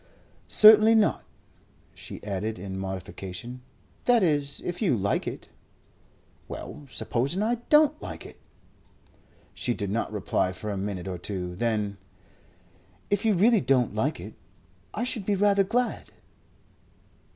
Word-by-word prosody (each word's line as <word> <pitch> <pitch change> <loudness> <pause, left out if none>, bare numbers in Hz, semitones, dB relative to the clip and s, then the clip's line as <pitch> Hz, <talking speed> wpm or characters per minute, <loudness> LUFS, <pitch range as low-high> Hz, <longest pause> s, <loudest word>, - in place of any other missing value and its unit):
"Certainly 215 +1 +8
not." 220 -2 +2 0.7
She - - -10
added 105 +2 -3
in 95 0 -6
modification: 95 +5 -6 0.4
"That 240 -4 +4
is 145 -4 0
if 175 +3 -4
you 170 - +2
like 100 0 -1
it." - - -6 1.0
"Well, 150 -2 -8
supposing 135 - -1
I 235 +2 +1
don't 305 0 +4
like - - -7
it?" - - -13 1.1
She 120 - -2
did 100 -3 -3
not 115 +1 -1
reply 95 -3 -1
for 105 +3 -5
a - - -3
minute 95 -2 -4
or 90 -2 -4
two. 90 -2 -4
Then: 105 -2 -1 1.1
"If 205 +3 +1
you 215 -3 +3
really 220 +5 +4
don't 125 -1 +2
like - - -1
it, - - -9 0.6
I 220 - -3
should 245 -4 -1
be 200 +1 0
rather 200 0 +3
glad." 245 +5 -2
125 Hz, 135 wpm, -26 LUFS, -, 1.1 s, Certainly